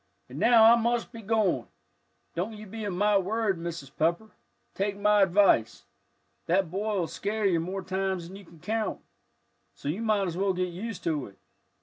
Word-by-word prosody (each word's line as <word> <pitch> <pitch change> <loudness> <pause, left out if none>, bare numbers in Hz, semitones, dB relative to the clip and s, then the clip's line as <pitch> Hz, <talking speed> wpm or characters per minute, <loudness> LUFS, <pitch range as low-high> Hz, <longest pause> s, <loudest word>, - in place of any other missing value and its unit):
"And - - -8
now 230 -1 +6
I 230 +1 +8
must 235 0 0
be 230 - -9
a - - -9
goin'. 205 - +1 0.7
Don't 185 +6 -3
you 215 - -9
be 220 +2 -7
a - - -1
mite 200 +2 +2
worried, 210 0 0
Mrs. 165 -5 -7
Pepper, 170 +8 0 0.4
take 200 +1 -2
my 210 0 +4
advice; 190 - +3 0.6
that 180 -1 +1
boy'll 200 -1 -1
scare 205 +6 -3
you 180 -4 +3
more 185 +3 -4
times 190 -1 -2
than 185 - -11
you 200 - -11
can 165 -1 -17
count. 220 +3 -2 0.8
So 140 - -5
you 180 +9 -2
might 215 -3 +1
as 170 -1 -4
well 195 0 +1
get 180 0 -1
used 220 +3 -6
to 155 -5 -1
it. 100 -1 -17
195 Hz, 190 wpm, -28 LUFS, 175-215 Hz, 0.8 s, I